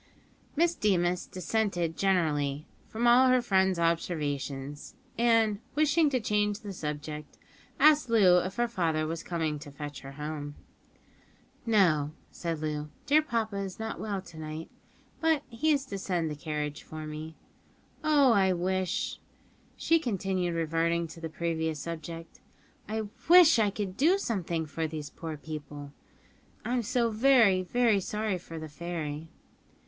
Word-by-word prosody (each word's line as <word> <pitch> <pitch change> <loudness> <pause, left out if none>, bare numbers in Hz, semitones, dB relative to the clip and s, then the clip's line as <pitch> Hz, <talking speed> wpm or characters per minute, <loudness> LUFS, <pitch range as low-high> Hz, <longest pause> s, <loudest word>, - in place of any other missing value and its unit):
Miss 340 +3 +3
Deemas 180 - +1
dissented 185 -4 -1
generally 155 -6 +1 0.2
from 230 +2 -2
all 245 +2 +7
her 255 0 +5
friend's 190 -5 +2
observations, 145 -4 -2 0.2
and, 225 -3 +3 0.2
wishing 305 +1 +3
to 260 -2 +1
change 210 -2 0
the 205 -3 -6
subject, 150 -2 -6 0.4
asked 300 -2 +5
Loo 190 -6 +6
if 185 +2 -4
her 240 0 +1
father 165 -8 0
was 165 +1 -3
coming 160 -4 -2
to 145 0 -10
fetch 145 0 -7
her 135 0 -9
home. 150 0 -5 1.1
"No," 160 -9 +3 0.2
said 165 -3 -4
Loo; 150 -1 -3 0.2
"dear 300 +2 +5
papa 225 -8 -2
is 195 -2 -4
not 220 0 -5
well 200 -3 -3
to 165 -2 -12
night, 155 +1 -6 0.5
but 320 -3 +2
he 270 +7 -1
is 285 -2 +1
to 200 -7 -5
send 175 -5 -1
the - - -4
carriage 150 -1 -4
for 155 0 -8
me. 155 +1 -7 0.7
Oh, 290 -4 +5
I 190 -3 +3
wish," 185 0 -1 0.6
she 330 0 +3
continued, 190 - -1
reverting 165 +1 0
to 165 +1 -11
the 165 - -4
previous 160 -1 -2
subject, 165 +1 -7 0.5
"I 220 0 -1 0.3
wish 340 -6 +8
I 210 -2 +3
could 200 -2 -5
do 335 +8 +4
something 175 - -2
for 160 +2 -3
these 150 -2 -6
poor 160 -2 -6
people. 145 -2 -8 0.7
I'm 245 0 0
so 235 0 0
very, 220 -5 +5
very 225 +2 +2
sorry 210 0 -2
for 165 -1 -9
the 155 0 -6
fairy." 160 -1 -5
180 Hz, 145 wpm, -29 LUFS, 155-220 Hz, 1.1 s, wish